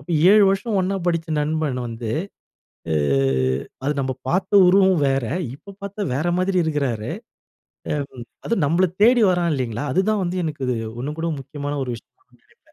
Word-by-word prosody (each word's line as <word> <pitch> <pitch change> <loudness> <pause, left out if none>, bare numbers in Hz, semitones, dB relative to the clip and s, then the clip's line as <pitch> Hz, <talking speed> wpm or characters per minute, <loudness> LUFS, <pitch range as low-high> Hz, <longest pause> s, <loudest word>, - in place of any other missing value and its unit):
அப்ப 140 - -11 0.2
7 210 0 +7
வருஷம் 200 +3 0
ஒண்ணா 195 +2 -1
படிச்ச 165 -1 0
நண்பன் 150 -3 -1
வந்து 115 -1 -5 0.8
ஆ - - +2 0.9
அது 145 - +1
நம்ப 130 -1 -1
பார்த்த 185 +5 0 0.2
உருவம் 190 -2 +5
வேற 135 -2 +1 0.3
இப்ப 200 +7 -13
பார்த்தா 200 +1 -6
வேற 155 +7 -1
மாதீரி 185 0 +1
இருக்கிறாரு. 135 -8 -1 0.8
அ - - +1 0.5
அதும் 225 -9 +1
நம்மள 175 +5 +3 0.2
தேடி 240 +1 +6
வரான் 175 -2 +1
இல்லைங்களா? 125 0 -3
அதுதான் 200 +2 +1
வந்து 175 +1 -2
எனக்கு 150 -4 -4
இது 125 - 0 0.2
உண்ணும் 150 +5 -5
கூட 165 +1 -1
முக்கியமான 145 +2 -5
ஒரு 125 - -5
விஷயம் 115 - -13 0.3
நெனைப்பேன். - - -30
160 Hz, 160 wpm, -22 LUFS, 135-190 Hz, 0.9 s, 7